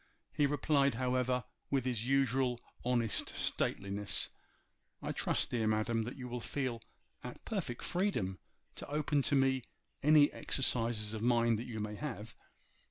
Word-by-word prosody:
He 145 -2 +3
replied, 140 -2 +2
however, 125 0 0 0.3
with 135 -3 0
his 120 -2 -1
usual 130 -2 +2 0.2
honest 120 -3 +2
stateliness, 100 -2 0 0.7
'I - - -2
trust, - - +1
dear 115 -3 0
madam, 110 +1 +1
that 120 - -6
you 125 -2 -6
will 125 0 -4
feel 125 -1 -3 0.4
at 125 - -9
perfect 180 - -3
freedom 175 - -1 0.4
to - - -6
open 150 0 +1
to 140 - +1
me 135 -1 +3 0.4
any 150 0 +6
exercises 115 -5 +1
of 110 - -4
mind 115 -1 +3
that 120 - -6
you 110 -3 -5
may 105 0 -3
have. 115 -4 -6
125 Hz, 145 wpm, -34 LUFS, 115-135 Hz, 0.7 s, any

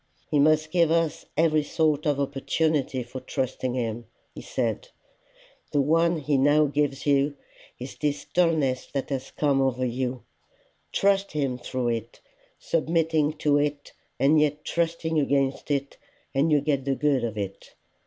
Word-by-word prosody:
"He 150 - +3
must 155 +1 +3
give 170 -2 +3
us 165 -2 0
every 155 -1 +3
sort 155 0 0
of 145 -1 +1
opportunity 140 -1 0
for 120 +2 -8
trusting 130 -1 -3
him," 115 -2 -3 0.3
he - - -9
said. - - -2 0.9
"The 145 - +3
one 165 +4 +2
he 145 -2 0
now 145 +3 +4
gives 145 -2 -1
you, 140 0 +2 0.4
is 125 +2 -8
this 145 -1 -2
dulness 160 -7 +1
that 140 0 -4
has 135 -2 -3
come 140 -2 +1
over 130 -1 0
you. 125 0 -3 0.7
Trust 195 0 +1
him 135 -4 -1
through 125 0 -2
it, 115 0 -4 0.4
submitting 165 - +1
to 150 -1 +2
it 145 0 -2 0.3
and 150 +3 +4
yet 150 0 0
trusting 165 -1 0
against 140 -1 0
it, 140 -1 -2 0.4
and 145 +4 +2
you 145 -2 +4
get 140 -2 0
the 135 -1 +1
good 140 -4 +1
of 110 -2 -3
it. 100 -1 -6
145 Hz, 155 wpm, -26 LUFS, 135-155 Hz, 0.9 s, now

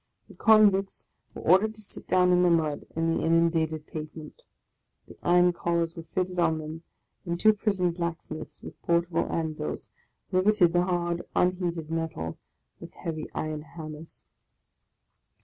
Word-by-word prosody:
The - - -14
convicts 205 -3 +4 0.3
were - - -8
or 185 +3 +6
dered 220 +2 -3
to 215 - -13
sit 205 - -7
down 180 0 +4
in 180 0 +4
the 180 - +4
mud 155 -3 +1
on 165 0 0
the - - -1
inundated 160 -2 +2
pavement; 155 - -8 0.7
the - - -13
iron 175 0 +4
collars 170 -1 -1
were 165 -1 -9
fitted 185 -1 -1
on 160 -2 +3
them, 155 +1 -7 0.4
and 170 -1 -3
two 215 +2 +6
prison 195 -4 0
blacksmiths, 165 -2 -5
with - - -11
portable 170 0 +1
anvils, 155 - -3 0.4
riveted 185 -2 +4
the 175 0 +3
hard, 175 -1 -1
unheated 175 -3 0
metal 160 - -3 0.4
with - - -11
heavy 160 -2 -5
iron 155 -1 -3
hammers. 155 0 -10
170 Hz, 150 wpm, -27 LUFS, 160-180 Hz, 0.7 s, or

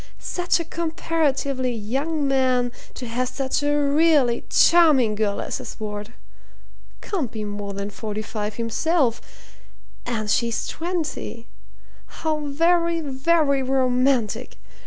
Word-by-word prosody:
Such 355 -1 0
a 335 - -3
comparatively 300 -6 -1
young 275 +8 -1
man 255 -2 +2 0.2
to 250 - -6
have 245 +2 -1
such 270 0 -1
a 290 0 +1
really 290 -4 +3
charming 305 -10 +5
girl 210 -1 -1
as - - -3
his - - -8
ward! 210 +1 -5 0.9
Can't 330 - -2
be 220 -2 -5
more 205 -1 -5
than 200 +1 -4
forty 215 0 -5
five 210 -1 -4
himself, 235 +2 +1 0.8
and 225 -3 -3
she's 235 -1 +1
twenty 320 -8 -4 0.6
how 315 -1 -2
very, 335 +3 +2
very 280 0 +2
romantic! 255 -3 +1
265 Hz, 115 wpm, -23 LUFS, 230-315 Hz, 0.9 s, charming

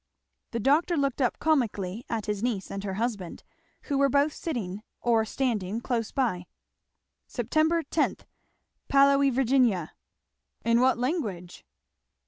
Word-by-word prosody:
The 235 - -3
doctor 315 - +2
looked 275 -1 0
up 250 - +1
comically 230 -9 0
at 225 -2 -2
his 210 -2 -2
niece 225 -5 -2
and 195 0 -5
her 195 -2 -3
husband, 210 -5 -3 0.4
who 280 -2 -1
were 275 0 +4
both 285 +3 +2
sitting 210 - -4 0.2
or 230 -2 +2
standing 220 -5 -1
close 235 -2 -2
by. 215 -10 -1 0.8
"'Sep. - - -5
10. 315 -1 +2 0.7
Paolo 275 0 +5
e 280 - +4
Virginia.' 245 - +2 0.7
In 230 +1 +4
what 260 0 +4
language?" 225 - -3
240 Hz, 130 wpm, -27 LUFS, 205-275 Hz, 0.8 s, Paolo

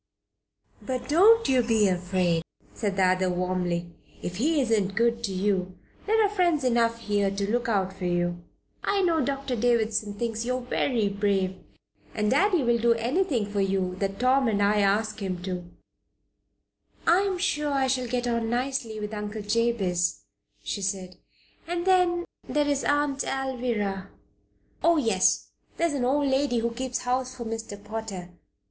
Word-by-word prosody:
"But 255 -1 -4
don't 425 +9 +5
you 260 -2 +4
be 225 -3 +3
afraid," 180 -2 +1 0.3
said 205 -3 -2
the 190 - +2
other, 185 0 +2
warmly. 180 -1 -1 0.3
"If 180 0 -4
he 300 +7 +2
isn't 215 -6 +1
good 235 0 +1
to 200 - -4
you 185 -1 -1 0.3
there 440 0 +4
are - - +1
friends 350 -7 +1
enough 230 -2 +2
here 205 -2 +1
to 200 +1 -2
look 240 0 0
out 190 -3 0
for 190 -1 -6
you. 175 0 -1 0.4
I 400 -1 +1
know 330 -4 +2
Doctor 275 -1 -2
Davison 220 -3 +1
thinks 225 +1 -2
you 250 +1 -1
are - - -5
very 245 -2 0
brave, 200 -2 0 0.6
and 210 -1 +1
Daddy 375 -6 +3
will 235 -1 +2
do 235 0 +3
anything 250 - 0
for 205 0 -2
you 190 -1 0
that 195 0 -2
Tom 260 +1 +3
and 210 -2 +1
I 205 +1 +3
ask 210 +2 +1
him 185 -2 -3
to." 180 -2 -5 1.4
"I 340 +3 +5
am 395 -1 0
quite 360 - -4
sure 295 -5 0
I 275 -1 +2
shall 255 -1 0
get 245 +1 -1
on 235 -2 0
nicely 245 -2 -2
with 210 +1 -5
Uncle 210 0 -5
Jabez," 205 - 0 0.4
she 200 - -3
said. 190 -2 -3 0.5
"And 345 +1 -2
then, 360 -2 +3 0.2
there 295 -1 +1
is 285 -1 0
Aunt 290 -1 +1
Alvirah." 240 -8 -2 0.8
"Oh, 335 0 +5
yes. 225 -10 +2 0.3
There 335 - +2
is 335 - 0
an 265 -3 0
old 285 +3 +2
lady 265 -2 +1
who 235 0 -1
keeps 255 +1 -3
house 255 +1 -1
for 235 - -6
Mr. 225 -2 -5
Potter. 210 -4 -6
230 Hz, 170 wpm, -26 LUFS, 195-265 Hz, 1.4 s, don't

